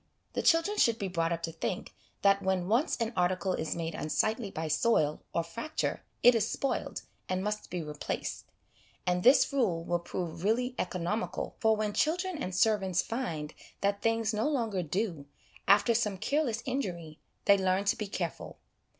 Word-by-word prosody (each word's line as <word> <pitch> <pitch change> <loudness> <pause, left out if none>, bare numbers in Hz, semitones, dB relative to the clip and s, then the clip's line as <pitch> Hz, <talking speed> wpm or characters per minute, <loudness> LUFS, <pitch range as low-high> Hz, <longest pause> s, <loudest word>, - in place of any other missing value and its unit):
The - - 0
children 340 +6 +3
should 230 -1 +4
be 195 -3 -3
brought 165 -2 0
up 170 0 -2
to 165 - -2
think 165 +3 -4 0.3
that 200 0 +5
when 190 -2 0
once 240 - +2
an 230 0 -2
article 180 +1 +1
is 160 - -2
made 165 -1 -3
unsightly 215 +9 0
by 160 -3 -4
soil 155 -2 +2
or 170 - 0
fracture 230 - -3 0.2
it 245 - +9
is 225 -1 +1
spoiled, 275 - -2 0.3
and 185 0 0
must 210 +1 -3
be 175 -2 -3
replaced; 150 -1 -4 0.6
and 180 0 +1
this 260 +5 +5
rule 195 -12 +1
will 175 0 0
prove 170 -1 -5
really 245 +5 +1
economical, 185 +4 -2
for 220 -2 +4
when 210 -1 -1
children 355 - 0
and 185 0 -3
servants 190 -3 +2
find 165 - -3 0.3
that 200 0 +1
things 225 -1 +1
no 215 +7 +1
longer 225 -10 0
'do/ 170 -3 -2 0.4
after 205 +4 +5
some 210 -4 0
careless 255 - 0
injury, 175 - -3 0.3
they 200 - +7
learn 190 +1 +1
to - - +3
be 210 - -4
careful. 175 -4 -4
200 Hz, 170 wpm, -30 LUFS, 175-230 Hz, 0.6 s, it